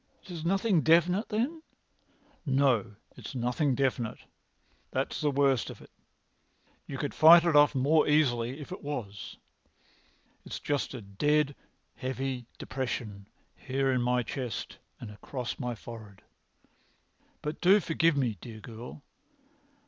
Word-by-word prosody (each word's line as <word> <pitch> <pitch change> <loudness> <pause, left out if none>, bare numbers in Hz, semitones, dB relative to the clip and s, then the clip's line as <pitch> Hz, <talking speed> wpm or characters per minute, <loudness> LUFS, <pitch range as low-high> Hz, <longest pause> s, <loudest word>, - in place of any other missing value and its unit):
"It 190 - -12
is 165 -3 -6
nothing 195 0 +2
definite, 175 +6 +3
then?" 250 +10 -1 0.8
"No, 130 - +2 0.2
it - - -9
is - - -8
nothing 125 +3 0
definite. 125 -4 -1 0.7
That's - - -2
the 150 - +2
worst 135 -3 +2
of - - -9
it. - - -16 1.0
You 135 - -5
could 145 +1 -3
fight 165 +2 +8
it 150 -4 +5
more 145 +4 +3
easily 130 -4 +2
if 150 - -9
it 185 - -6
was. 115 -9 -6 1.1
It's - - -6
just 145 -2 -2
a 120 - -7
dead, 145 +8 +1 0.4
heavy 130 -1 -3
depression 110 -6 -4 0.3
here 135 0 -1
in 125 -1 +1
my 125 0 +1
chest 125 -2 -5 0.2
and 110 - -8
across 125 +4 -6
my 125 -1 -3
forehead. 110 -3 -11 1.2
But 150 +1 -4
do 190 +4 +6
forgive 165 -3 +2
me, 120 -8 0
dear 115 -2 -9
girl! 120 +6 -10
135 Hz, 135 wpm, -29 LUFS, 120-155 Hz, 1.2 s, fight